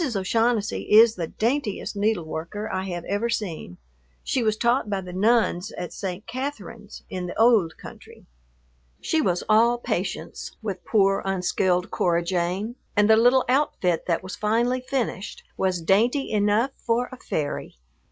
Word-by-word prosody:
O'Shaughnessy 220 Hz, +2 st, +1 dB
is 220 Hz, +1 st, +7 dB
the 170 Hz, -6 st, -4 dB
daintiest 230 Hz, -, -2 dB
needleworker 200 Hz, -1 st, -2 dB
I 185 Hz, 0 st, -2 dB
have 175 Hz, -3 st, -5 dB
ever 205 Hz, +4 st, -1 dB
seen; 170 Hz, -, -4 dB, 0.5 s
she 260 Hz, -, 0 dB
was 215 Hz, -2 st, +1 dB
taught 235 Hz, -1 st, +1 dB
by 200 Hz, -1 st, -1 dB
the 180 Hz, -1 st, -8 dB
nuns 210 Hz, -1 st, +2 dB
at 175 Hz, -, -6 dB
St. 190 Hz, +1 st, -5 dB
Catherine's 230 Hz, -5 st, -6 dB
in 180 Hz, -1 st, -5 dB
the 175 Hz, -, -6 dB
"ould 220 Hz, -8 st, +4 dB
country." -, -, -13 dB, 0.7 s
She 320 Hz, -, 0 dB
was 180 Hz, -, 0 dB
all 230 Hz, +3 st, +4 dB
patience 240 Hz, -, -4 dB
with 195 Hz, -4 st, -4 dB
poor, 195 Hz, -3 st, +3 dB
unskilled 185 Hz, -1 st, 0 dB
Cora 170 Hz, -1 st, +1 dB
Jane, 185 Hz, +6 st, -2 dB, 0.2 s
and 205 Hz, -1 st, +4 dB
the 220 Hz, -, +7 dB
little 245 Hz, +3 st, +4 dB
outfit 235 Hz, -, +1 dB
that 170 Hz, 0 st, 0 dB
was 185 Hz, 0 st, -6 dB
finally 235 Hz, +4 st, +1 dB
finished 250 Hz, -7 st, -3 dB
was 185 Hz, -2 st, 0 dB
dainty 235 Hz, -, +2 dB
enough 210 Hz, +5 st, +2 dB
for 240 Hz, +1 st, 0 dB
a 255 Hz, -, -9 dB
fairy. 150 Hz, -10 st, -4 dB
210 Hz, 150 wpm, -24 LUFS, 185-235 Hz, 0.7 s, is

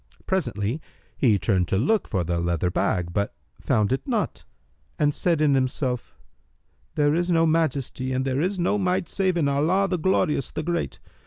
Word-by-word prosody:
Presently, 125 Hz, -, -1 dB, 0.3 s
he 115 Hz, -6 st, +3 dB
turned 95 Hz, -3 st, +1 dB
to 95 Hz, -, 0 dB
look 205 Hz, -, +1 dB
for 95 Hz, -4 st, -1 dB
the 85 Hz, 0 st, -1 dB
leather 85 Hz, +1 st, 0 dB
bag, 85 Hz, -1 st, 0 dB
but 100 Hz, +2 st, -1 dB, 0.2 s
found 105 Hz, +1 st, +1 dB
it 135 Hz, -, -3 dB
not 230 Hz, -6 st, -2 dB, 0.5 s
and 145 Hz, -1 st, +2 dB
said 170 Hz, -1 st, 0 dB
in 150 Hz, -2 st, +4 dB
himself, 130 Hz, -1 st, -1 dB, 0.8 s
"There 145 Hz, -1 st, +3 dB
is 175 Hz, +2 st, 0 dB
no 165 Hz, -1 st, +4 dB
Majesty 150 Hz, -5 st, 0 dB
and 130 Hz, +1 st, 0 dB
there 135 Hz, +1 st, 0 dB
is 190 Hz, +3 st, 0 dB
no 180 Hz, +4 st, +1 dB
Might 180 Hz, -2 st, 0 dB
save 190 Hz, -2 st, 0 dB
in 155 Hz, -4 st, +2 dB
Allah, 160 Hz, +8 st, +2 dB
the 180 Hz, -2 st, -1 dB
Glorious, 155 Hz, -5 st, +1 dB
the 155 Hz, -, -4 dB
Great! 170 Hz, +1 st, -2 dB
145 Hz, 175 wpm, -24 LUFS, 115-175 Hz, 0.8 s, in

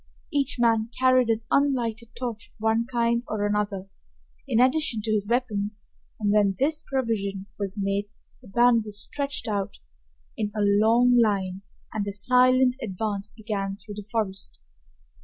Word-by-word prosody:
Each 280 Hz, -2 st, +1 dB
man 230 Hz, -2 st, +2 dB
carried 255 Hz, -2 st, +4 dB
an 225 Hz, 0 st, +1 dB
unlighted 240 Hz, -5 st, 0 dB
torch 235 Hz, -3 st, -5 dB
of -, -, -28 dB
one 225 Hz, +2 st, +1 dB
kind 235 Hz, -2 st, +1 dB
or 210 Hz, -1 st, -1 dB
another, 205 Hz, -2 st, -1 dB, 0.6 s
in 225 Hz, -, +2 dB
addition 255 Hz, -1 st, +2 dB
to 220 Hz, -, -1 dB
his 205 Hz, -2 st, 0 dB
weapons, 215 Hz, -4 st, -1 dB, 0.4 s
and 205 Hz, -2 st, +1 dB
when 205 Hz, -2 st, +3 dB
this 305 Hz, +3 st, +1 dB
provision 210 Hz, -7 st, -2 dB
was 200 Hz, 0 st, -3 dB
made 200 Hz, +1 st, -1 dB, 0.3 s
the 250 Hz, -, -15 dB
band 235 Hz, +2 st, +4 dB
was 210 Hz, -1 st, -4 dB
stretched 280 Hz, 0 st, -3 dB
out 200 Hz, -1 st, -2 dB, 0.6 s
in 215 Hz, -, -1 dB
a 210 Hz, -, 0 dB
long 225 Hz, +5 st, +4 dB
line 195 Hz, -4 st, +1 dB, 0.3 s
and 205 Hz, -2 st, -2 dB
a 200 Hz, -, -3 dB
silent 255 Hz, +3 st, +4 dB
advance 205 Hz, 0 st, -3 dB
began 200 Hz, -3 st, -4 dB
through 210 Hz, +1 st, -10 dB
the 205 Hz, 0 st, -8 dB
forest. 205 Hz, -4 st, -3 dB
220 Hz, 155 wpm, -26 LUFS, 205-245 Hz, 0.6 s, carried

